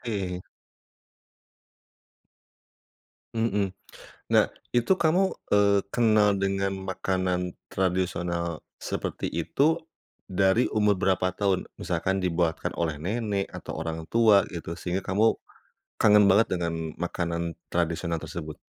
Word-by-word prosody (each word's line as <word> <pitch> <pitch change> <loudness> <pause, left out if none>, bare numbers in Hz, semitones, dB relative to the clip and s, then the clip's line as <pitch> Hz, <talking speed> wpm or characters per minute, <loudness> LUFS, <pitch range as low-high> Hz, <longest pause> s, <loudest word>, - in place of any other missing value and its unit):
Oke. 95 -6 -3 2.9
Mmm. 105 -4 0 0.6
Nah, - - +6 0.3
itu 120 +10 +3
kamu, 185 +3 +2 0.2
eee, 100 -1 +5
kenal 110 -4 +4
dengan 95 0 0 0.2
makanan 90 -1 -1 0.2
tradisional 90 -3 -1 0.2
seperti - - -3
itu, 145 - +1 0.5
dari 95 +5 +3
umur 105 -1 +3
berapa 95 0 +1
tahun? 100 -2 0
Misalkan 95 +2 -1
dibuatkan 85 -2 0
oleh 80 -3 0
nenek 100 +3 -2
atau - - -7
orang 80 0 -4
tua 110 -3 +5
gitu, 85 -2 -6
sehingga 90 +1 -2
kamu 105 +4 +3 0.7
kangen 105 -1 +6
banget 100 +4 +5
dengan 80 -2 -2
makanan 85 -1 -2 0.2
tradisional 85 -1 -1
tersebut. 80 -1 -7
95 Hz, 105 wpm, -27 LUFS, 85-105 Hz, 2.9 s, Nah